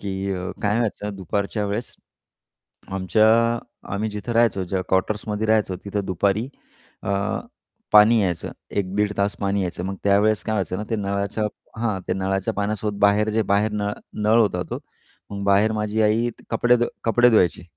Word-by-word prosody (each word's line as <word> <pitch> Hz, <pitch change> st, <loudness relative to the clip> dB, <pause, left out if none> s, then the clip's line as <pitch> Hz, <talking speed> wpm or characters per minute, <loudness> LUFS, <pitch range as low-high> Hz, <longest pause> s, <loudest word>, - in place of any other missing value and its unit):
की 95 Hz, 0 st, -3 dB, 0.3 s
काय 105 Hz, +2 st, +2 dB
व्हायचं 105 Hz, -3 st, -2 dB
दुपारच्या 100 Hz, +3 st, -2 dB
वेळेस, 105 Hz, +4 st, -4 dB, 0.9 s
आमच्या 95 Hz, +3 st, +2 dB, 0.7 s
आम्ही 110 Hz, +2 st, -1 dB
जिथं 105 Hz, +3 st, -5 dB
राहायचो 115 Hz, -5 st, +2 dB
ज्या 95 Hz, +1 st, -2 dB
कॉटर्समध्ये 105 Hz, +3 st, 0 dB
राहायचो 110 Hz, -4 st, +2 dB
तिथं 100 Hz, 0 st, -2 dB
दुपारी 100 Hz, +6 st, 0 dB, 0.5 s
अ, -, -, -3 dB, 0.8 s
पाणी 105 Hz, +2 st, +7 dB
यायचं, 90 Hz, -3 st, -2 dB, 0.2 s
एक-दीड 100 Hz, +1 st, 0 dB
तास 100 Hz, 0 st, +1 dB
पाणी 100 Hz, 0 st, 0 dB
यायचं. 90 Hz, -1 st, -4 dB
मग 95 Hz, +1 st, -3 dB
त्यावेळेस 100 Hz, -1 st, +3 dB
काय 110 Hz, -, -2 dB
व्हायचं 95 Hz, -3 st, -1 dB
ना, 105 Hz, -, -4 dB
ते 115 Hz, -, +1 dB
नळाच्या 100 Hz, +1 st, -2 dB, 0.4 s
हां, 105 Hz, -5 st, -1 dB
ते -, -, +2 dB
नळाच्या 95 Hz, 0 st, -1 dB
पाण्यासोबत 105 Hz, 0 st, -2 dB
बाहेर 105 Hz, +1 st, +4 dB
जे 110 Hz, +1 st, +1 dB
बाहेर 105 Hz, +2 st, +2 dB
न 105 Hz, -1 st, -1 dB, 0.3 s
नळ 110 Hz, +2 st, +4 dB
होता 100 Hz, -5 st, +1 dB
तो -, -, -3 dB, 0.5 s
मग 100 Hz, -1 st, -5 dB
बाहेर 100 Hz, +2 st, +4 dB
माझी 105 Hz, 0 st, 0 dB
आई 110 Hz, +3 st, +2 dB, 0.2 s
कपडे 120 Hz, +2 st, +3 dB
धु 120 Hz, -, +1 dB, 0.2 s
कपडे 120 Hz, +2 st, +5 dB
धुवायची 90 Hz, -6 st, +3 dB
105 Hz, 160 wpm, -23 LUFS, 100-110 Hz, 0.9 s, पाणी